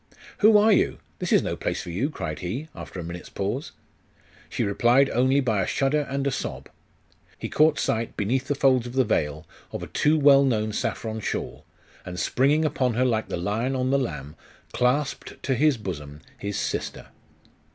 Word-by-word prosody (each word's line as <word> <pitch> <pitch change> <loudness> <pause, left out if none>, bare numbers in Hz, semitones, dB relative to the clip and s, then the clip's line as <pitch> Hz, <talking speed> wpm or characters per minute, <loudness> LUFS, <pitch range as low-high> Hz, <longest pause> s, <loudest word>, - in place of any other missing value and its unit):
'Who 215 0 +7
are 215 +2 +5
you? - - +2 0.2
This - - -3
is - - +5
no - - -2
place - - -3
for 85 - -7
you!' 110 - -1
cried 80 - -5
he, 125 - -4
after 95 - -8
a - - -4
minute's 85 +1 -7
pause. 105 +9 -3 0.8
She - - -1
replied 120 +7 +3
only 130 +3 +3
by 110 -6 +1
a - - -1
shudder 145 +1 +1
and 140 0 -2
a 140 - +1
sob.... 135 - -5 0.7
He - - -5
caught 155 0 +4
sight, 115 0 -1
beneath 125 +6 0
the 145 - 0
folds 130 -3 +3
of 120 - -8
the 130 0 +3
veil, 80 - -1 0.3
of - - -5
a - - -10
too 150 +1 +3
well 140 -2 +6
known 110 -5 0
saffron 110 +1 -3
shawl, - - -4 0.4
and 90 0 -6
springing 145 - +2
upon 130 -5 0
her 130 +2 +2
like 110 -3 0
the - - -2
lion 110 +9 -1
on 130 0 0
the 140 - +3
lamb, 75 - -5 0.4
clasped 135 +3 0
to 135 - +1
his 145 +1 +3
bosom 75 -8 -7
his 100 0 -4
sister. - - -3
125 Hz, 190 wpm, -25 LUFS, 100-140 Hz, 0.8 s, Who